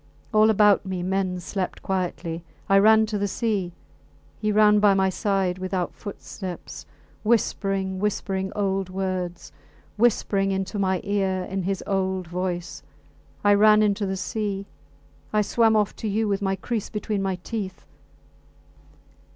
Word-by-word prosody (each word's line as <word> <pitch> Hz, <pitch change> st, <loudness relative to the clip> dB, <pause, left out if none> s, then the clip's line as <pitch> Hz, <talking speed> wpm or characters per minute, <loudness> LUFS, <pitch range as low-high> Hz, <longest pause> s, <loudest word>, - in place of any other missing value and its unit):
All 215 Hz, 0 st, +6 dB
about 210 Hz, -2 st, +5 dB
me 190 Hz, -2 st, -4 dB
men 185 Hz, -1 st, -1 dB
slept 185 Hz, +1 st, -4 dB
quietly. 175 Hz, -3 st, -3 dB, 0.2 s
I 195 Hz, 0 st, +5 dB
ran 220 Hz, +2 st, +6 dB
to 210 Hz, -1 st, -3 dB
the 205 Hz, -, 0 dB
sea. 200 Hz, -4 st, -1 dB, 0.7 s
He 215 Hz, -1 st, 0 dB
ran 210 Hz, 0 st, +5 dB
by 205 Hz, -1 st, +5 dB
my 190 Hz, 0 st, +2 dB
side 190 Hz, -2 st, 0 dB
without 185 Hz, -1 st, -2 dB
footsteps, 190 Hz, -3 st, -8 dB, 0.3 s
whispering, 195 Hz, -4 st, 0 dB
whispering 190 Hz, -1 st, -1 dB
old 195 Hz, -2 st, -1 dB
words 185 Hz, -2 st, -3 dB, 0.5 s
whispering 200 Hz, -3 st, +2 dB
into 195 Hz, +2 st, -2 dB
my 190 Hz, -2 st, +1 dB
ear 195 Hz, -2 st, 0 dB
in 190 Hz, +1 st, -3 dB
his 190 Hz, +1 st, -2 dB
old 190 Hz, -2 st, -1 dB
voice. 175 Hz, 0 st, -3 dB, 0.6 s
I 205 Hz, 0 st, +6 dB
ran 215 Hz, +1 st, +6 dB
into 205 Hz, -1 st, +1 dB
the 190 Hz, 0 st, -2 dB
sea; 200 Hz, -1 st, -3 dB, 0.7 s
I 210 Hz, -1 st, +2 dB
swam 225 Hz, +1 st, +3 dB
off 210 Hz, -1 st, +1 dB
to 220 Hz, -, -4 dB
you, 215 Hz, +2 st, 0 dB
with 200 Hz, 0 st, 0 dB
my 195 Hz, -1 st, 0 dB
kriss 225 Hz, +1 st, -3 dB
between 210 Hz, -1 st, -2 dB
my 190 Hz, -1 st, 0 dB
teeth. 200 Hz, -5 st, -5 dB
195 Hz, 145 wpm, -24 LUFS, 185-210 Hz, 0.7 s, All